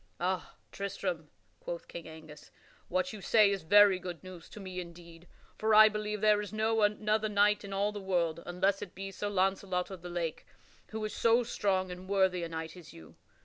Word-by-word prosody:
"Ah, 185 +1 -2 0.2
Tristram," 185 -5 -4 0.3
quoth - - -6
King 170 -1 -8
Angus, 155 -2 -12 0.4
"what 185 +2 -1
you 210 - -8
say 210 +1 +5
is 195 -1 -2
very 200 +2 +6
good 180 -2 -7
news 185 -2 -11
to - - -11
me 185 -2 -6
indeed. 170 -1 -11 0.3
For 220 0 +3
I 215 0 +9
believe 210 -1 -3
there 210 -1 +4
is 205 - -7
no 220 +1 +1
other 210 +1 +1
knight 210 0 +3
in 200 - -8
all 200 +1 0
the 205 -1 -7
world 170 -4 0
(unless 190 +3 +1
it 180 - -8
be 195 +1 -6
Sir 205 +2 -4
Launcelot 190 -1 0
of 185 -3 -8
the 175 - -8
Lake) 170 -2 -4 0.4
who 220 0 -4
is 210 - -4
so 230 +1 +3
strong 190 -5 -1
and 180 +1 -9
worthy 190 -2 +2
a 170 - -4
knight 160 0 -6
as 175 -4 -13
you. 80 -1 -14
190 Hz, 200 wpm, -31 LUFS, 175-210 Hz, 0.4 s, I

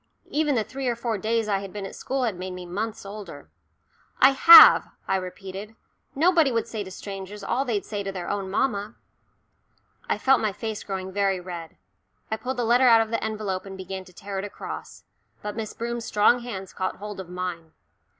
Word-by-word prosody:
Even 300 -2 +1
the 220 - +1
three 265 +5 -5
or 240 - +1
four 230 -2 -2
days 225 +2 0
I 200 -2 +1
had 195 -1 -8
been 205 0 -6
at - - -8
school 265 -1 -2
had 225 -6 0
made 185 +1 -6
me 180 0 -8
months 210 +5 -4
older. 195 - -9 0.7
"I 265 - +7
have," 330 +5 +10 0.2
I 190 - +1
repeated. 195 +3 -7 0.4
"Nobody 325 -1 +4
would 230 -1 -1
say 220 -3 -4
to 190 - -9
strangers 195 +1 -8
all 260 +7 0
they'd 215 -6 -1
say 205 -2 -4
to 195 -1 -4
their 180 -2 -6
own 200 -2 -3
mamma." 205 0 -1 1.1
I - - +1
felt 270 -1 +3
my 215 -2 0
face 220 +1 -5
growing 190 -1 -5
very 195 -1 +1
red; 175 - -8 0.5
I 220 - 0
pulled 260 +3 -4
the 245 - 0
letter 245 +3 +4
out 230 -2 +7
of 225 0 -3
the 230 - -1
envelope 215 -4 -3
and 195 0 -8
began 190 0 -6
to 185 - -16
tear 195 +2 -6
it - - -4
across. 205 - -8 0.4
But 210 0 -4
Miss 220 -2 -4
Broom's 235 0 -4
strong 215 +4 +4
hands 200 -6 -7
caught 185 - -2
hold 205 0 -8
of 185 -2 -8
mine. 180 -3 -5
205 Hz, 205 wpm, -25 LUFS, 190-230 Hz, 1.1 s, have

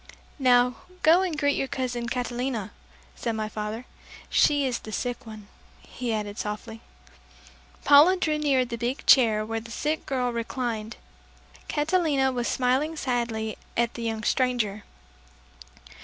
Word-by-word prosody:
"Now 250 -2 +4 0.3
go 330 +4 +6
and 355 -5 -2
greet 285 -1 +2
your 270 - -1
cousin 245 -3 -3
Catalina," 245 -3 -3 0.4
said 230 - -2
my 215 -1 -2
father. 215 +3 -5 0.5
"She 290 -1 +4
is 250 -3 -1
the 215 - -10
sick 245 +2 -4
one," 215 -2 -10 0.4
he 245 -2 -5
added 210 -1 -3
softly. 220 +2 -5 1.0
Paula 300 +6 +7
drew 310 -4 0
near 275 -4 +2
the 235 -1 -6
big 245 +4 -3
chair 220 -5 +5
where 225 +1 -3
the 230 +1 -12
sick 300 +6 -2
girl 250 -2 -1
re 235 0 -1
clined. 230 -3 -4 0.7
Catalina 295 -4 +1
was 245 -2 -2
smiling 265 +5 +1
sadly 235 -6 -2 0.2
at 235 0 +1
the 235 - -7
young 225 -1 -3
stranger. 235 -6 0
245 Hz, 140 wpm, -26 LUFS, 225-270 Hz, 1.0 s, Paula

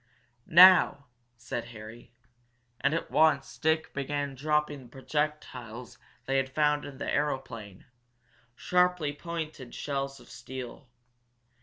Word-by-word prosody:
"Now!" 175 -5 +7 0.3
said 120 0 -5
Harry. 115 0 -11 0.7
And 135 +4 +1
at 165 - -4
once 145 -3 +2
Dick 160 0 +1
began 140 0 -3
dropping 145 -2 -1
projectiles 130 -4 -4 0.3
they 135 0 +1
had 135 0 0
found 150 +1 +1
in 140 -2 -9
the - - -5
aeroplane 115 -9 -3 0.7
sharply 180 -2 +1
pointed 155 -5 -6
shells 135 -1 -3
of - - -17
steel. 125 +1 -9
140 Hz, 110 wpm, -29 LUFS, 125-155 Hz, 0.7 s, Now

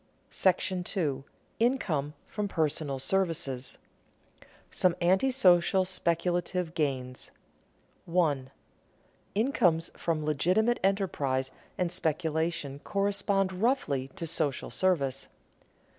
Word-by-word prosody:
§ 185 0 0
II. 140 -6 0 0.4
INCOME 170 - 0
FROM 210 -1 -3
PERSONAL 155 -5 -1
SERVICES 140 -5 -1 0.6
[Sidenote: - - -22 0.2
Some 180 -2 +2
anti 190 +9 +3
social 185 -6 +4
speculative 175 -1 -1
gains] 130 -5 -2 0.8
1. 155 -7 +1 0.9
_Incomes 185 - +2
from 160 -3 -1
legitimate 185 +11 +2
enterprise 145 -10 0 0.3
and 180 -2 0
speculation 160 -3 -1
correspond 195 +1 0
roughly 185 - 0
to 170 - -4
social 155 -4 -2
service. 140 -8 0
170 Hz, 90 wpm, -29 LUFS, 145-190 Hz, 0.9 s, social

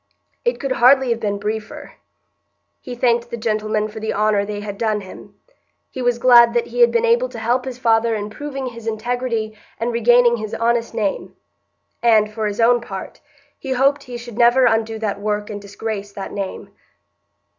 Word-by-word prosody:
It 485 - 0
could 275 - -3
hardly 260 0 +4
have 230 - 0
been 205 -3 -2
briefer. 215 +1 -5 0.9
He 250 - -8
thanked 240 -1 +1
the 235 - -5
gentlemen 215 -1 -1
for 215 +1 -9
the 220 0 -3
honour 210 -1 +2
they 205 0 -5
had 205 -1 -7
done 215 -2 0
him. 190 - -12 0.6
He 260 - -6
was 245 -1 +1
glad 240 -1 +6
that 240 - +2
he - - -7
had 475 - +6
been 470 0 +2
able 480 +2 +2
to - - -10
help 240 +3 0
his 255 -2 -6
father 230 -2 +2
in 210 0 -5
proving 275 +1 -6
his 230 -2 -8
integrity 225 -1 -2 0.2
and 235 +1 -2
regaining 240 +1 +4
his 215 -1 -5
honest 230 0 0
name; 210 -4 -2 0.7
and, 215 -2 +3
for 215 -1 -2
his 205 +1 -5
own 240 +1 +4
part, 195 -5 -8 0.4
he 265 -2 -3
hoped 275 +3 +2
he 245 -1 -7
should 235 -1 -9
never 240 +2 +5
undo 225 -1 +1
that 205 -2 -3
work 210 0 -2
and 205 -1 -6
disgrace 205 0 -6
that 195 - -7
name. 195 -2 -6
230 Hz, 190 wpm, -20 LUFS, 215-245 Hz, 0.9 s, glad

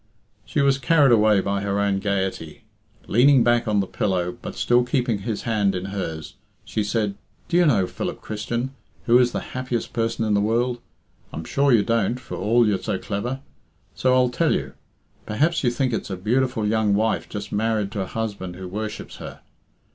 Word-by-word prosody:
She - - 0
was 140 -1 +3
carried 145 -1 +4
away 105 -3 +5
by 100 0 -1
her 100 0 -1
own 100 -1 +1
gaiety. 95 -5 -3 0.4
Leaning 130 +2 +5
back 120 0 +2
on 105 -2 +2
the - - -2
pillow, 90 -2 -1
but - - -7
still 120 0 +3
keeping 125 -3 0
his 105 +2 -4
hand 105 -4 +1
in 90 +1 -3
hers, 80 -5 -5 0.3
she 110 - -1
said, 105 0 -1 0.3
"Do 175 - +1
you 175 -2 +5
know, 105 -10 +3
Philip - - -5
Christian, 120 +4 -4 0.3
who 120 +1 +6
is 125 -1 +3
the - - -3
happiest 125 -2 -3
person 115 0 -1
in 105 - +1
the 100 - +3
world? 120 +3 0 0.5
I'm 80 - -6
sure 140 0 +2
you 115 -4 +5
don't, 115 +1 0
for 120 - -8
all 115 +5 +3
you're 100 -3 +1
so 95 - -2
clever. 115 +8 -4 0.5
So 130 0 +2
I'll 125 -1 +4
tell 160 +6 +1
you. 65 -1 -4 0.5
Perhaps 155 +11 +1
you 125 - +4
think 125 +1 -1
it's 110 - -3
a 95 - -4
beautiful 120 +3 0
young 105 -1 +2
wife 110 +2 0
just 100 -1 -6
married 105 -1 0
to 105 -3 -3
a 95 - -3
husband 100 -5 -4
who 95 0 -7
worships 105 +3 -6
her. - - -9
110 Hz, 195 wpm, -23 LUFS, 100-125 Hz, 0.5 s, who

